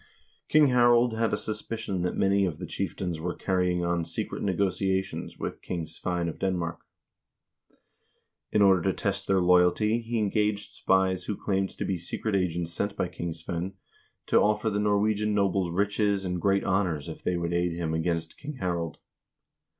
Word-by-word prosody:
King 150 -2 +6
Harald 120 -1 +5
had 115 0 +1
a - - +1
suspicion 110 -3 -3
that 90 - -1
many 100 +1 +3
of 85 -6 -1
the 90 - -6
chieftains 90 -2 -3
were 85 +1 -3
carrying 90 -2 0
on 85 -1 0
secret 80 - -4
negotiations 95 0 -1
with - - -5
King 85 -3 -3
Svein 85 +2 -3
of 85 - -5
Denmark. 90 -3 -1 1.7
In 105 - +4
order 95 -3 +5
to 95 +2 +1
test 100 -1 -2
their 95 -1 +3
loyalty 90 +5 +4
he 115 0 -3
engaged 105 -1 0
spies 95 -1 +1
who 105 - -3
claimed 95 -1 0
to - - -2
be 95 - -1
secret 100 +5 -3
agents 85 -3 -1
sent 100 +3 -2
by 90 - -1
King 85 0 -4
Svein 85 +3 -4 0.5
to - - +4
offer 105 +1 +2
the 105 - 0
Norwegian 105 0 +1
nobles 95 -3 +1
riches 100 +2 +1
and 90 -1 -2
great 100 -1 +2
honors 90 -7 0
if - - -7
they 90 - 0
would 85 0 -2
aid 85 0 +1
him 85 -2 -2
against 80 0 -2
King 150 +1 -6
Harald. 85 - -3
95 Hz, 170 wpm, -27 LUFS, 85-105 Hz, 1.7 s, King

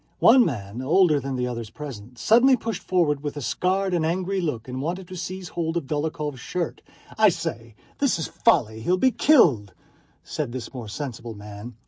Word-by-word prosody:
One 245 +2 +7
man, 110 - -4
older 155 +2 +4
than 135 0 -4
the 125 -1 -1
others 115 -3 -5
present, 125 -3 -9
suddenly 245 - +5
pushed 225 -1 -4
forward 160 -6 +1
with 145 0 -5
a - - -4
scared 190 +7 0
and 170 -2 +1
angry 185 +4 -1
look 130 -9 -3
and 130 +1 -4
wanted 175 +5 -3
to 185 - -7
seize 185 0 -6
hold 165 0 -2
of 165 - -3
Dólokhov's 150 -1 -3
shirt. 170 +6 -4 0.4
"I - - +7
say, 115 -1 -5 0.2
this 280 -8 +2
is 160 - -2
folly! 110 -1 +1
He'll 180 +10 +1
be 260 +7 +3
killed," 145 - +4 0.5
said 150 -8 -4
this 130 -1 -6
more 120 -4 -7
sensible 120 0 -6
man. 105 +3 -9
150 Hz, 185 wpm, -24 LUFS, 120-180 Hz, 0.5 s, One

